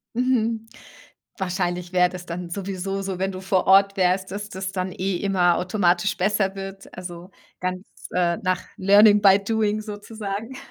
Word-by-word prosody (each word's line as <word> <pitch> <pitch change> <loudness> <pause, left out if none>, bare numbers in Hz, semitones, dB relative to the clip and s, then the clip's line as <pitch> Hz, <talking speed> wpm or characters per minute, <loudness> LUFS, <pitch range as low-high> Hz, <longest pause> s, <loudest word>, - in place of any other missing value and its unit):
Mhm. 230 -3 0 0.7
Wahrscheinlich 180 -1 -2
wäre 180 -1 +4
das 180 -1 -9
dann 175 0 -6
sowieso 195 +1 -4
so, 190 -2 -4
wenn 195 +1 0
du 185 - -7
vor 190 -1 +1
Ort 195 +1 +6
wärst, 185 0 +1
dass 205 +1 -5
das 190 -1 -5
dann 185 0 -2
eh 190 +1 -2
immer 180 -3 +2
automatisch 185 +1 +1
besser 195 0 +1
wird, 195 0 -8
also 175 +1 -8 0.3
ganz, 185 +1 -4 0.3
äh, 175 -1 +1
nach 185 -1 -1 0.2
learning 205 +2 +6
by 195 -1 +6
doing 215 0 0
sozusagen. 210 +2 -6
195 Hz, 155 wpm, -23 LUFS, 180-205 Hz, 0.7 s, Ort